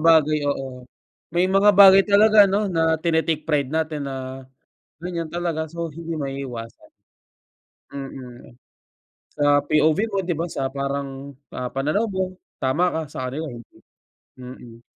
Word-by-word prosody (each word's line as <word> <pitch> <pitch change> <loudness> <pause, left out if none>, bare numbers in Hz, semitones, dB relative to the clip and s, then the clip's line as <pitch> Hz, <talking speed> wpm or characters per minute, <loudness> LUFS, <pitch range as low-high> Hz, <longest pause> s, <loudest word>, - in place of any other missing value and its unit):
bagay 155 -2 +4
oo. 130 -2 -4 0.5
May 175 +2 +2
mga 195 +2 +5
bagay 195 0 +8
talaga 210 +1 +6
'no, 200 +2 0
na 160 -2 +1
tine-take 160 -2 0
pride 145 -3 0
natin 155 -2 -2
na 130 0 -7 0.6
ganyan 170 -2 -4
talaga, 170 -2 -2
so 170 0 -4
hindi 165 +2 -6
maiiwasan. 135 -5 -6 1.0
Mm, 130 -3 -9 0.8
sa 145 - -1 0.2
POV 155 +1 +3
mo 200 - 0
di 175 -1 -2
ba 165 +3 -3
sa 135 -5 -3
parang, 140 0 -4 0.2
ah, 125 -1 -3
pananaw 155 +12 0
mo 190 -2 -3 0.2
tama 135 +7 +1
ka, 160 - -1
sa - - -6
kanila 150 +5 -4
hindi, 120 -1 -13 0.6
mm. 125 -2 -11
155 Hz, 135 wpm, -22 LUFS, 135-175 Hz, 1.0 s, bagay